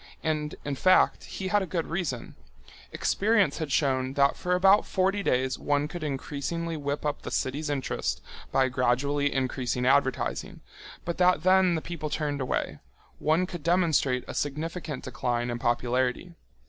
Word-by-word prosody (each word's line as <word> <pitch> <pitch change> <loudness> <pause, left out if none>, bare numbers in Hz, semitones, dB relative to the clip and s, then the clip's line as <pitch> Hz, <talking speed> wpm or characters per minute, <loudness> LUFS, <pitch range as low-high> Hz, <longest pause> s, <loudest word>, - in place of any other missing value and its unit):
And, 155 -1 -1
in 145 - -2
fact, 185 +7 +3
he 190 -1 -5
had 205 +1 +3
a 190 - -3
good 170 -2 -2
reason. 165 -9 -3 0.6
Experience 205 -2 +2
had 155 -3 -3
shown 130 -3 +1
that 140 0 +3
for 180 0 0
about 195 +3 +5
forty 195 +1 +1
days 130 -6 0
one 145 0 +1
could 170 +1 -7
increasingly 150 +4 -3
whip 145 0 -3
up 150 - -2
a - - -5
city's 145 +4 -2
interest 130 - -2 0.3
by 135 -1 +3
gradually 135 +3 +1
increasing 125 -2 -1
advertising, 135 0 +1 0.4
but 170 0 -3
that 180 -3 +4
then 185 -1 +4
the 160 - -2
people 170 -3 -5
turned 145 -2 -2
away—one 130 - -2
could 175 -2 -7
demonstrate 160 -7 +2
a - - -6
significant 155 +1 -3
decline 120 -1 -2
in 120 - -3
popularity. 125 +7 0
145 Hz, 150 wpm, -27 LUFS, 130-175 Hz, 0.6 s, about